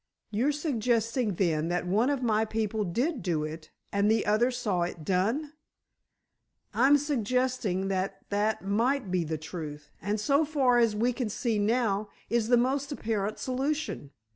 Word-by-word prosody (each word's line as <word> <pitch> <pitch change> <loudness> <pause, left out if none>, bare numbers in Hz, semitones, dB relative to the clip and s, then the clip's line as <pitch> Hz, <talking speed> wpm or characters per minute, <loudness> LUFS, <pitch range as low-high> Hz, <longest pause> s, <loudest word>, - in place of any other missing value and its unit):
"You're 240 +8 +2
suggesting, 240 - 0
then, 165 -4 +1
that 175 +1 -1
one 210 +8 +2
of 280 -3 -1
my 220 -2 +2
people 220 -1 -1
did 245 - -1
do 170 -4 0
it, 155 +1 -7 0.2
and 200 +1 +2
the 220 0 +2
other 215 +4 +3
saw 220 -8 -1
it 170 -2 -3
done?" 225 - 0 1.2
"I'm 280 +2 +5
suggesting 250 -7 0
that 190 0 -2
that 210 +1 0
might 230 +2 +1
be 180 -2 +1
the 160 0 -3
truth, 150 -2 -7
and 205 +4 -1
so 280 +7 +3
far 270 -5 +3
as 230 -3 +3
we 240 +4 +1
can 245 -3 -2
see 220 +1 -1
now, 210 -1 +1 0.2
is 235 -2 +2
the 245 0 +5
most 270 +4 0
apparent 215 -6 -2
solution. 270 - -2
220 Hz, 160 wpm, -28 LUFS, 195-255 Hz, 1.2 s, I'm